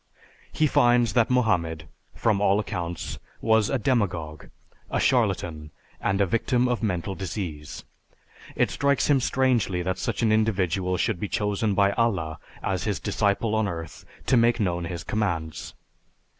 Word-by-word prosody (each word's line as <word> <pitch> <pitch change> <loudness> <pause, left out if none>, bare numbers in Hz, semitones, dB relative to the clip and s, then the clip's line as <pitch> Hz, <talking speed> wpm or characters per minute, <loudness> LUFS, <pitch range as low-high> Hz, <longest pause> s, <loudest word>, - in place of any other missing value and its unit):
He 155 - +1
finds 120 -4 +3
that 120 -3 +3
Mohammed, 85 -11 +1 0.3
from 105 -3 +1
all 100 0 +3
accounts, 85 -6 -4 0.2
was 110 -2 +3
a 135 - +1
demagogue, 90 - -1 0.4
a - - -1
charlatan, 75 -3 0 0.3
and 95 +1 0
a 100 - +4
victim 120 +6 +1
of 125 -1 -1
mental 95 -3 -1
disease. 90 -6 -6 0.7
It - - +1
strikes 140 +1 +1
him 140 - +5
strangely 120 -9 +1
that 95 +1 -2
such - - -2
an 110 - +3
individual 95 -4 +1
should 110 -1 0
be 105 - -2
chosen 105 0 0
by 100 0 +4
Allah 95 -9 -1 0.2
as 95 -1 -1
his 100 -7 -1
disciple 105 +4 0
on 110 -1 +1
earth 80 -3 -6 0.2
to - - +3
make 120 0 +3
known 90 -4 0
his 85 -1 -5
commands. 85 -7 -3
100 Hz, 150 wpm, -25 LUFS, 85-115 Hz, 0.7 s, him